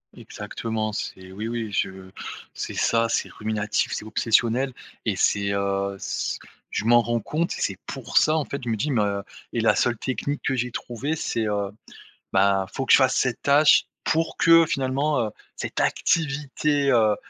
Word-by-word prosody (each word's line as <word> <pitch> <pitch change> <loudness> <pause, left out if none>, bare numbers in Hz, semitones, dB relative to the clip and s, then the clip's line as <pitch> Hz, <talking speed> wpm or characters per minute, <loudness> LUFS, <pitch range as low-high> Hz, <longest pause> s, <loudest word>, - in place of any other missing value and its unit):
Exactement, 110 -1 -4
c'est 95 -2 -6
oui 105 +4 -5
oui 115 -2 -3
je 95 -1 -3 0.4
c'est - - -5
ça, 115 0 +2
c'est - - 0
ruminatif, 105 -1 -1
c'est 110 - -5
obsessionnel 115 +4 +2 0.3
et - - +1
c'est, 100 -1 +1
heu, 100 0 -1
c - - -3 0.3
je 105 - -3
m'en 120 0 +6
rends 120 0 0
compte 155 +10 -2
et - - -6
c'est 95 - -1
pour 135 -4 -3
ça 155 +1 +3
en 150 - 0
fait, 140 - -5
je 120 - -3
me 115 - +1
dis 145 +8 -1
mais 115 - +2
heu 100 -1 -1 0.3
et - - 0
la - - +4
seule 120 -2 +1
technique 140 +4 -3
que 135 - +1
j'ai 125 0 -1
trouvé 125 +7 -3
c'est, 115 -7 -1
heu, 100 -1 -1 0.6
ben 95 0 +3
faut 135 - -3
que - - +1
je - - +10
fasse 130 -1 +3
cette 125 -2 0
tâche 145 +2 +5 0.2
pour 165 0 0
que 165 -1 +6
finalement, 135 +2 0
heu, 110 - -3 0.3
cette - - -4
activité, 145 -2 +1
heu 110 -3 +4
115 Hz, 185 wpm, -24 LUFS, 105-140 Hz, 0.6 s, je